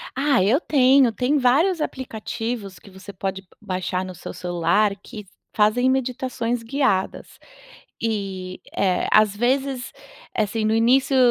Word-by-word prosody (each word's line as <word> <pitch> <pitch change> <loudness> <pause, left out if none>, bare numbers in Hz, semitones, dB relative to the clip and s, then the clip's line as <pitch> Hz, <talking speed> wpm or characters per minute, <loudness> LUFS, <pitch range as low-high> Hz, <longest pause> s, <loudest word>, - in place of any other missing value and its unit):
Ah, 270 -6 +2
eu 240 +10 +3
tenho. 265 -3 +4
Tem 255 +6 0
vários 305 +7 +3
aplicativos 225 -5 -5
que 200 - -16
você 190 +2 -11
pode 190 0 -4
b 190 - -32
baixar 185 -1 -3
no 185 -1 -8
seu - - -8
celular, 180 +4 +1
que 210 -2 -9 0.3
fazem 230 +4 +3
meditações 250 -2 -1
guiadas. 230 -6 -1 0.7
E, 195 -4 -3 0.2
é, 185 -2 +1
às 215 -1 +5
vezes, 260 +2 -1 0.5
assim, 215 +1 0
no 220 - +2
início 260 +4 +3
225 Hz, 135 wpm, -22 LUFS, 195-260 Hz, 0.7 s, às